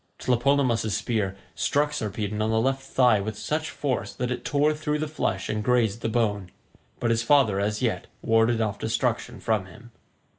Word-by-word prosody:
Tlepolemus's 120 -5 +1
spear 105 -5 -1 0.2
struck 145 +1 +1
Sarpedon 105 -4 -3
on 110 - +1
the 110 0 +2
left 135 +3 +1
thigh 125 -5 +3
with 110 +1 -4
such 155 +6 -2
force 135 -4 -2
that 125 0 -2
it 125 - -3
tore 145 +1 +2
through 150 0 -2
the 155 +1 -2
flesh 95 -11 -2
and 105 0 -2
grazed 115 -3 +2
the 115 - -1
bone, 105 -5 0 0.5
but 120 - +1
his 115 0 +2
father 115 -6 +3
as 105 +1 -1
yet - - -1 0.2
warded 115 +1 +3
off 105 -2 -1
destruction 120 +1 -1
from 110 -5 0
him. 120 +7 -15
115 Hz, 180 wpm, -26 LUFS, 105-135 Hz, 0.5 s, thigh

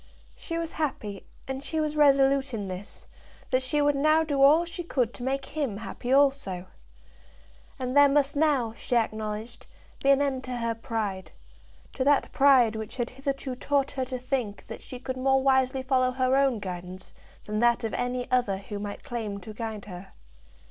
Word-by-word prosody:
She 330 - -5
was 330 -1 -3
happy, 215 -10 -4 0.2
and 265 +1 -4
she 320 +2 -2
was 305 -1 -1
resolute 275 -3 +4
in 205 -3 -4
this, 185 +2 -8 0.5
that 255 0 +3
she 290 +3 +1
would 290 0 +3
now 310 +3 +4
do 285 -3 -1
all 305 +5 +6
she 345 +1 -6
could 250 -8 -1
to - - -10
make 270 +2 -2
him 280 -10 -3
happy 240 +3 -5
also. 270 -10 +2 1.1
And 255 -1 -3
there 285 0 +7
must 285 0 +2
now, 285 -7 +2
she 245 - -3
acknowledged, 220 0 -2 0.3
be 275 - +2
an 275 0 +6
end 275 -2 -1
to 255 -1 -4
her 230 -1 -1
pride, 220 -5 -4 0.6
to 260 - -1
that 285 +1 +3
pride 260 -5 +5
which 220 +3 -6
had 240 -1 -2
hitherto 270 0 -4
taught 280 +2 0
her 265 -2 -2
to 255 0 -4
think 250 -5 -3
that - - -9
she 255 - -9
could 260 +1 -5
more 265 +1 +2
wisely 265 -1 +2
follow 255 -1 +2
her 255 0 +1
own 270 -3 +3
guidance 185 -1 -7 0.3
than 210 0 -2
that 240 +1 +3
of 225 - -2
any 245 0 -2
other 245 -6 +2
who 200 +1 -7
might 205 0 -6
claim 225 -7 -4
to 215 +3 -9
guide 220 -2 -5
her. 185 -1 -10
255 Hz, 185 wpm, -27 LUFS, 220-275 Hz, 1.1 s, there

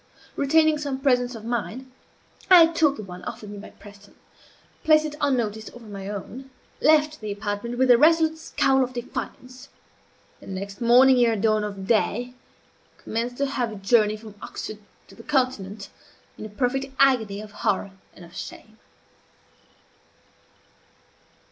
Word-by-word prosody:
Retaining 310 +2 +3
some 280 -3 -3
presence 250 -3 +1
of 220 -1 -9
mind, 245 +2 -4 0.6
I 355 -3 +9
took 320 -3 +1
the 215 - -7
one 180 -2 -10
offered 210 -1 -7
me 205 - -8
by 210 - -10
Preston; 205 0 -16 0.7
placed 310 -1 +5
it, 305 - -4
unnoticed, 220 -6 -1
over 240 -1 -12
my 200 -2 -8
own; 235 +6 -7 0.3
left 305 -1 +3
the 215 -1 -4
apartment 205 +4 -4
with 260 0 +4
a 240 - +6
resolute 320 +1 +4
scowl 270 -4 +2
of 255 0 -5
defiance; 255 +2 -7 0.7
and, 190 - -7
next 200 +3 -7
morning 250 +2 +6
ere 230 -1 +2
dawn 215 0 +1
of 200 -2 -5
day, 235 +3 0 0.6
commenced 240 +3 -4
a - - +3
hurried 235 -7 -3
journey 215 0 +3
from 215 -1 -12
Oxford 215 - -7 0.3
to - - -16
the - - -13
continent, 225 -7 -2 0.5
in 215 - -8
a - - -14
perfect 255 +5 -1
agony 235 -7 +3
of 210 0 -9
horror 200 -1 -1 0.2
and 175 - -13
of 170 - -17
shame. 220 0 -9
240 Hz, 150 wpm, -24 LUFS, 210-270 Hz, 0.7 s, I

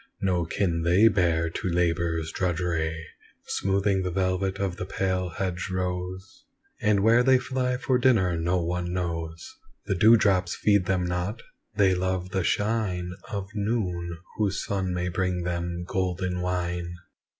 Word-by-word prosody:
No 90 -3 +1
kin 85 -1 0
they 90 +7 +5
bear 85 -5 +1
to 95 - -3
labour's 85 -2 0
drudgery, 85 -3 -1 0.4
Smoothing 95 0 +1
the 90 - -1
velvet 95 +1 0
of 95 -3 -2
the - - -4
pale 95 -1 -1
hedge 90 +1 -3
rose; 90 +1 -4 0.4
And 105 -2 +3
where 115 +3 +5
they 130 +1 +5
fly 125 0 -1
for 130 0 +1
dinner 110 -9 +3
no 85 +2 +1
one 90 +1 -2
knows 85 - -4 0.3
The 100 - 0
dew 110 +5 +6
drops 95 -4 +2
feed 100 -3 +3
them 95 -1 +1
not 90 +5 -3 0.3
they 95 -2 +4
love 95 0 -1
the 95 -2 0
shine 100 -4 0 0.2
Of 100 -4 -4
noon, 95 -6 -2 0.2
whose 105 -2 0
sun 95 -4 -1
may 90 0 -1
bring 90 0 -1
them 85 0 -3
golden 90 -1 -1
wine. 90 -1 -2
90 Hz, 150 wpm, -26 LUFS, 85-100 Hz, 0.4 s, dew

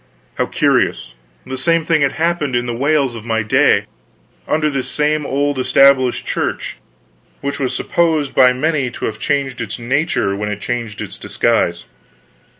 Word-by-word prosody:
How - - +1
curious. - - 0 0.3
The 130 - -5
same 165 +4 +2
thing 160 -2 +2
had 140 -1 +2
happened 160 -5 -1
in 120 0 0
the 120 - -3
Wales 140 0 +1
of 115 - -8
my 110 -1 -1
day, 105 - +3 0.6
under 155 0 +1
this 135 -3 -2
same 150 0 0
old 140 0 0
Established 130 -1 +4
Church, - - -3 0.6
which 140 0 -3
was 130 -2 -1
supposed 160 -5 0
by 125 -1 +6
many 140 0 0
to - - -6
have 110 0 -4
changed 140 -2 -1
its 110 -2 -4
nature 125 - 0
when 105 +1 -3
it 100 -1 -4
changed 115 -1 -4
its 105 -3 -7
disguise. 100 -4 0
130 Hz, 160 wpm, -17 LUFS, 115-150 Hz, 0.6 s, by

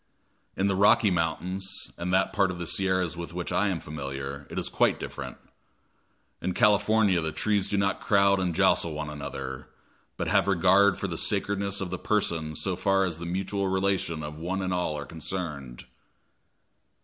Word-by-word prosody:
In 95 - +1
the 100 -1 +2
Rocky 105 +2 +5
Mountains, 90 +3 -2
and 85 +1 -3
that 95 +1 +2
part 100 -3 +3
of 90 - -4
the 85 - -4
Sierras 95 -1 0
with 85 0 -7
which 90 -1 -4
I 105 - +2
am 95 -4 -1
familiar, 70 -2 -6
it - - -7
is - - 0
quite - - +2
different. - - -6 1.0
In 90 0 -2
California 105 -3 +4
the 80 0 -2
trees 105 +2 0
do 100 - -1
not 100 0 0
crowd 100 -1 +4
and 90 -3 -1
jostle 85 0 +3
one 75 0 -4
another, 70 -3 -6 0.5
but - - -2
have - - +3
regard 95 +1 +4
for - - -2
the - - -3
sacredness 100 0 0
of 90 -2 -4
the 90 - -3
person 80 -7 -1
so 95 +2 -1
far 95 +1 +2
as 85 -3 -4
the 85 - -5
mutual 95 +2 -2
relation 95 -4 0
of 75 +1 -7
one 95 +3 -2
and 90 -1 -1
all 90 -4 -1
are 75 - -5
concerned. 75 -7 -5
90 Hz, 180 wpm, -27 LUFS, 80-100 Hz, 1.0 s, Rocky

